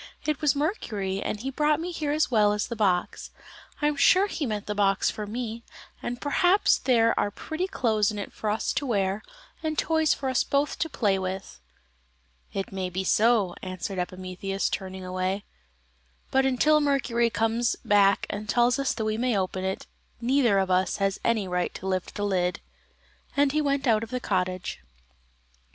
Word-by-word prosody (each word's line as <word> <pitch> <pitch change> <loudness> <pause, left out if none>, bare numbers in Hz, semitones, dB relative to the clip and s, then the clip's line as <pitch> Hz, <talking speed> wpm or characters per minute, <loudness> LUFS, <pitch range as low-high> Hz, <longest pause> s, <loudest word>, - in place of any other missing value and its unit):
"It 305 0 -1
was 300 -1 +3
Mercury, 210 - -2
and 210 - -3
he 270 +2 -3
brought 300 +2 +2
me 350 +2 -4
here 305 -4 -2
as 305 -2 +1
well 210 -3 +4
as 210 - -1
the 235 - -5
box. 190 -5 0 0.5
I - - +4
am 295 - +1
sure 365 +7 +5
he 320 -8 -3
meant 210 -2 -3
the 210 - -2
box 195 -1 +2
for 210 -1 -6
me, 230 +1 -4 0.4
and 240 0 -4
perhaps 355 +8 +3
there 230 -3 +3
are - - +1
pretty 315 - -4
clothes 220 - +1
in 210 - -4
it 200 - -6
for 215 - -3
us 215 +1 0
to 275 +1 -2
wear, 200 -3 0 0.4
and 310 -1 -2
toys 320 -1 +2
for 270 - -3
us 260 - +2
both 280 +1 0
to 325 - 0
play 200 -8 +1
with." 190 +1 -5 0.9
"It 195 - -4
may 190 -1 -3
be 185 +2 -3
so," 210 -2 +3
answered 185 +1 -4
Epimetheus, 185 +2 -3
turning 190 -1 -5
away; 185 +2 -2 0.9
"but 265 0 +3
until 300 +4 +3
Mercury 255 -5 +1
comes 225 +2 +1
back 200 -1 +4
and 205 +1 -5
tells 245 +4 +3
us 275 - +1
that 220 - -2
we 215 +1 -1
may 245 -3 +1
open 185 0 -2
it, 190 0 -3 0.3
neither 240 -3 +3
of 190 -1 +1
us 185 +1 +2
has 195 -1 0
any 220 -4 +1
right 180 -1 -1
to - - -8
lift 185 -2 -2
the 205 - -2
lid;" 180 -3 0 0.8
and 285 -1 +4
he 305 +1 +1
went 280 -1 0
out 220 -4 +3
of 225 - -6
the 250 - -2
cottage. 185 -4 -2
215 Hz, 185 wpm, -26 LUFS, 195-270 Hz, 0.9 s, sure